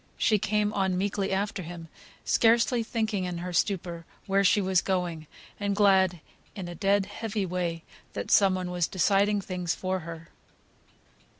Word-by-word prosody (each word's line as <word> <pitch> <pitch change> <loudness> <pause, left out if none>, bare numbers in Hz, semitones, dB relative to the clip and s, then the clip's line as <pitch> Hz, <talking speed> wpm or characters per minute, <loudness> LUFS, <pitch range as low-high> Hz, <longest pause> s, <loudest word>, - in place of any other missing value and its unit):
She 215 -2 +3
came 210 +1 0
on 190 -2 0
meekly 195 +1 -1
after 200 +1 -1
him, 170 -1 -8 0.4
scarcely 235 +1 +3
thinking 220 -4 -2
in 180 -1 -4
her 180 +1 -5
stupor 175 -2 -1 0.2
where 195 0 +2
she 200 +2 +4
was 190 -2 +2
going, 175 -5 -2 0.3
and 200 -1 -1
glad 190 -4 +3 0.3
(in 190 -3 -6
a 175 - -6
dead, 195 +2 +1
heavy 215 -1 -3
way) 170 -2 -3 0.3
that - - -4
some 195 -2 +5
one 180 -1 -4
was 175 -2 0
deciding 200 +2 +2
things 180 -2 -3
for 185 0 -2
her. 165 -1 -9
190 Hz, 160 wpm, -27 LUFS, 175-205 Hz, 0.4 s, some